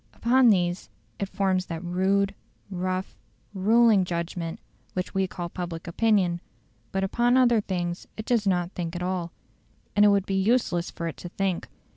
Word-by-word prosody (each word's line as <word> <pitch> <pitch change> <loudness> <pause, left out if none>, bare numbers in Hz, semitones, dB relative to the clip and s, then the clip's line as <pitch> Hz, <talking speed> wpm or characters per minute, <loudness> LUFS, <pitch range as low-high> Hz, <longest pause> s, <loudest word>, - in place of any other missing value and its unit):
Upon 250 +1 +4
these 180 -3 +1 0.3
it 195 - -2
forms 190 -2 0
that 165 +1 -5
rude, 195 +3 +1 0.4
rough, 185 0 -3 0.3
ruling 215 +1 +4
judgment 170 -1 -4 0.3
which 180 0 -3
we 195 0 +1
call 175 -1 -5
public 170 -1 -6
opinion; 180 -2 +1 0.5
but 195 0 -1
upon 240 +6 +2
other 240 -4 +4
things 175 -3 -3
it 215 - -5
does 230 -4 +1
not 175 -2 +1
think 170 -2 -4
at 175 - -3
all, 180 -2 -2 0.6
and 205 - +5
it - - +8
would 200 -2 +3
be 195 - -3
useless 195 -5 +1
for 170 - -5
it 165 - -5
to 175 - -8
think. 190 -1 -2
185 Hz, 165 wpm, -26 LUFS, 175-205 Hz, 0.6 s, it